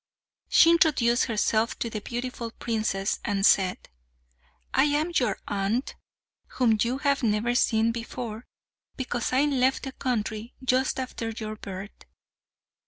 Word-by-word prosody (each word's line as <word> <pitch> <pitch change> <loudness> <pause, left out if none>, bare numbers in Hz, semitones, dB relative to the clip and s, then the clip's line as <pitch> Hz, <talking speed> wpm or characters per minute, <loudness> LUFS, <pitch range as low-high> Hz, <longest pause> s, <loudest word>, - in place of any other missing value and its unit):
She 335 - +7
introduced 260 -8 +3
herself 225 0 0
to - - -2
the 220 -2 -5
beautiful 240 0 -5
princess 215 -4 -2
and 200 -1 0
said, 185 -4 +4 1.0
"I - - +4
am 300 +3 +1
your 245 -10 +1
aunt, 205 +6 -1 0.6
whom 225 -4 +3
you 245 +3 +1
have 280 0 +1
never 225 +1 +1
seen 225 -2 +2
before, 230 -1 -6 0.5
because 245 -2 -2
I 260 +2 +3
left 265 -2 +1
the 270 - -4
country 230 -3 -3
just 255 +1 +1
after 250 -3 -4
your 215 -1 -5
birth." 200 -1 -9
235 Hz, 130 wpm, -26 LUFS, 215-255 Hz, 1.0 s, She